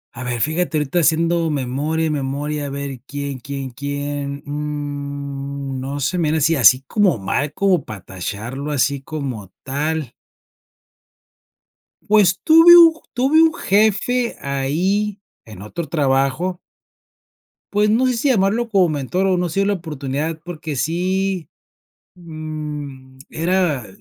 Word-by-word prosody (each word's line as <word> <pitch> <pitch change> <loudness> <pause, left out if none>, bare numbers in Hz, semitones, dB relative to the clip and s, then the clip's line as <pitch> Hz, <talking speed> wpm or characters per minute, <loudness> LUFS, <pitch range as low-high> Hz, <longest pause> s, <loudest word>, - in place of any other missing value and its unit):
A 120 - -6
ver, 120 -2 -3
fíjate, 160 +1 0
ahorita 150 +4 0
haciendo 165 +1 +2
memoria, 150 +4 -1
memoria, 145 +1 -2
a - - -5
ver, 140 -2 -5
¿quién 140 -2 -5
quién 135 +1 -6
quién?, 145 +1 -4
mm. 140 -2 -5
No 140 +2 -4
sé, 180 +7 -1
mira 160 -1 +1
así 160 +2 +3
así, 130 +1 +6
como 190 - +2
mal, 140 +9 -1
como 190 -6 +2
para 110 -6 -8
tacharlo, 110 +10 -5
así 140 -1 +1
como 135 - -6
tal 145 -1 -2 2.0
pues 205 -4 +4
tuve 330 +2 +8
un 330 -1 +8 0.2
tuve 275 +6 +4
un 325 0 +4
jefe, 220 - +1
ahí 180 +10 -1 0.3
en 105 -4 -11
otro 155 +10 -6
trabajo 145 +5 0 1.1
Pues 210 +1 +3
no 235 +5 +3
sé 255 - +2
si 235 +4 -1
llamarlo 225 +1 +2
como 195 -5 +4
mentor, 155 +6 -1
o 190 -1 +2
no 175 -1 -1
se 195 +5 0
dio - - +2
la 205 - +2
oportunidad, 155 -2 -4
porque 160 -3 -5
sí, 180 +4 -1 0.7
mm, 150 -5 -7
era 165 - 0
150 Hz, 130 wpm, -20 LUFS, 140-180 Hz, 2.0 s, tuve